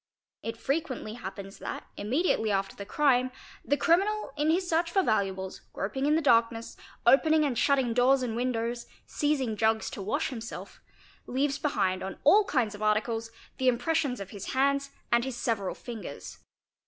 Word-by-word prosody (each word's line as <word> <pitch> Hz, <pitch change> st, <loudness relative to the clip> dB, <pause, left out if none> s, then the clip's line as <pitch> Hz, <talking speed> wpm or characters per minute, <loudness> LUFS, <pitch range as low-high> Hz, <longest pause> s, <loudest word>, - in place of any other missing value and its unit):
It 230 Hz, 0 st, -5 dB
frequently 265 Hz, -4 st, -2 dB
happens 195 Hz, -3 st, -8 dB
that, -, -, -5 dB
immediately 220 Hz, -, +1 dB
after 195 Hz, -1 st, -1 dB
the 200 Hz, -, -8 dB
crime, 255 Hz, -1 st, +2 dB, 0.3 s
the 285 Hz, -, +1 dB
criminal 395 Hz, +4 st, +2 dB
in 295 Hz, 0 st, 0 dB
bis 350 Hz, +3 st, +2 dB
search 335 Hz, 0 st, +1 dB
for 385 Hz, +2 st, +2 dB
valuables, 190 Hz, -, -1 dB
groping 265 Hz, +8 st, -2 dB
in 300 Hz, -, +4 dB
the 325 Hz, -, +1 dB
darkness, 230 Hz, -3 st, +2 dB, 0.3 s
opening 310 Hz, +5 st, +5 dB
and 270 Hz, -4 st, 0 dB
shutting 265 Hz, -1 st, +2 dB
doors 255 Hz, +2 st, +4 dB
and 230 Hz, -3 st, -2 dB
windows, 235 Hz, -1 st, -2 dB, 0.2 s
seizing 275 Hz, -7 st, 0 dB
jugs 220 Hz, +1 st, +1 dB
to -, -, -6 dB
wash 275 Hz, +11 st, -1 dB
himself, 235 Hz, -3 st, -8 dB, 0.5 s
leaves 275 Hz, +2 st, 0 dB
behind 190 Hz, -10 st, 0 dB
on 190 Hz, -, -5 dB
all 405 Hz, +8 st, +6 dB
kinds 240 Hz, -, 0 dB
of 205 Hz, -, -10 dB
articles 225 Hz, +2 st, 0 dB, 0.3 s
the 260 Hz, -, +1 dB
impressions 265 Hz, 0 st, +1 dB
of 195 Hz, -1 st, -7 dB
his 200 Hz, -2 st, -6 dB
hands 275 Hz, +1 st, +2 dB, 0.2 s
and 235 Hz, 0 st, +4 dB
his 260 Hz, -2 st, -4 dB
several 210 Hz, -7 st, -1 dB
fingers. 205 Hz, -, -8 dB
245 Hz, 165 wpm, -28 LUFS, 215-285 Hz, 0.5 s, all